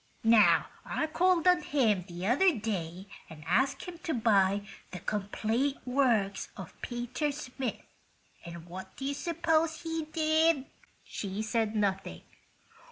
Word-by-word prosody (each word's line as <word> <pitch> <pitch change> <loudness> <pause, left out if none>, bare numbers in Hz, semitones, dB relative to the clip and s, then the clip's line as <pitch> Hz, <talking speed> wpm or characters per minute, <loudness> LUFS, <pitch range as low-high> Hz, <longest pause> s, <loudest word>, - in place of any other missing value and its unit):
Now, 225 -2 +6 0.2
I - - -1
called 345 +2 +2
on 360 -1 +5
him 220 - +1
the 175 0 -6
other 285 - +4
day 190 -4 -4 0.2
and 155 -2 -11
asked 250 +11 +1
him 350 -2 -8
to 330 -3 -2
buy 200 -3 +3 0.2
the 180 - -7
'Complete 220 - -1
Works 235 -7 +1
of 190 -4 -8
Peter 245 +5 -2
Smith,' 265 -4 -5 0.6
and 170 -1 -9
what 190 +2 -9
do 270 - -5
you 280 - 0
suppose 325 +1 0
he 325 -1 -3
did?" 315 -2 +2 0.4
She 200 +1 -4
said 220 0 0
nothing. 195 -2 -1
240 Hz, 135 wpm, -30 LUFS, 195-310 Hz, 0.6 s, Now